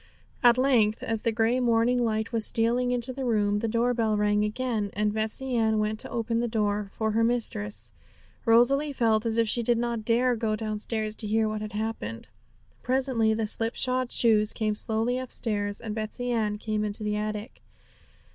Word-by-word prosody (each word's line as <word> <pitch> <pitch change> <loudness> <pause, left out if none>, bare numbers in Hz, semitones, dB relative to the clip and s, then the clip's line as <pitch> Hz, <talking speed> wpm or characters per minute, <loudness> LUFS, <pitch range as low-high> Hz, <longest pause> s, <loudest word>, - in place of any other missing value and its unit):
At 240 -1 +6
length, 240 -5 +2
as 225 -1 -1
the 230 - 0
grey 225 +3 +1
morning 240 0 +2
light 220 0 -1
was 230 -2 +1
stealing 235 +3 +1
into 245 +1 -1
the 265 +1 -5
room, 210 -4 +1
the 230 - -2
door 235 +2 +1
bell 220 -3 0
rang 210 0 +2
again, 215 -1 -2
and 210 0 0
Betsey 220 +4 -2
Ann 220 -2 +2
went 215 0 -1
to - - -2
open 230 0 -1
the 240 - 0
door 210 -2 -1
for 220 -1 -2
her 225 +2 +1
mistress. 220 -3 -1 0.5
Rosalie 270 +5 +3
felt 225 -3 +1
as 225 0 -1
if 230 -1 +2
she 235 - +2
did 235 0 +2
not 235 -1 -2
dare 240 +3 +2
to 230 - -5
go 220 -2 0
downstairs 215 0 -3
to 215 - -1
hear 220 +1 +1
what 215 0 -3
had 215 -1 -6
happened. 210 - -4 0.5
Presently 250 -4 +1
the 220 0 -1
slipshod 245 +3 -1
shoes 215 -2 +3
came 215 -2 -1
slowly 225 +3 +1
upstairs, 210 -5 -2
and 220 -2 -5
Betsey 220 +3 -4
Ann 215 -3 0
came 215 0 -2
into 210 0 -1
the 210 0 -1
attic. 215 +2 -5
225 Hz, 190 wpm, -27 LUFS, 215-240 Hz, 0.5 s, At